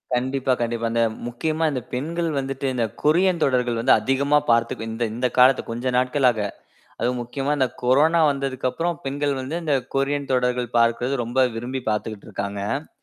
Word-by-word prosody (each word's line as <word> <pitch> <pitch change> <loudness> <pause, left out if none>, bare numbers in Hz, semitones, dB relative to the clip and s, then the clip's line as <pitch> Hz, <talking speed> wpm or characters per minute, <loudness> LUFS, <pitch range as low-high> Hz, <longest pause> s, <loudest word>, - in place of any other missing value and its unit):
கண்டிப்பா, 130 +1 0
கண்டிப்பா. 115 0 -1
இந்த 115 - +2 0.3
முக்கியமா 155 +7 -2
இந்த 130 -3 -3
பெண்கள் 165 +6 -2
வந்துட்டு 135 0 -4
இந்தக் 115 -4 -2
கொரியன் 175 +3 +3
தொடர்கள் 125 -3 +1
வந்து 125 +3 +4
அதிகமா 140 +2 +2
பார்த்து 115 -1 +1
இந்த 115 +2 -3
இந்தக் 125 +1 -2
காலத்து 125 +1 +6
கொஞ்ச 120 +2 -2
நாட்களாக. 125 -2 +2 0.6
அதுவும் 125 0 0
முக்கியமா 135 +4 -3
இந்தக் 130 -3 -1
கொரோனா 150 +7 +4
வந்ததுக்கப்புறம் 140 +4 -2
பெண்கள் 140 0 -1
வந்து 155 +7 -4
இந்தக் 135 -5 0
கொரியன் 140 0 0
தொடர்கள் 125 -1 0
பார்க்குறது 120 +3 +2
ரொம்ப 130 +2 +2
விரும்பிப் 125 +1 -4
பார்த்துட்டு 105 0 -4
இருக்காங்க. 100 +7 -3
130 Hz, 150 wpm, -23 LUFS, 120-140 Hz, 0.6 s, காலத்து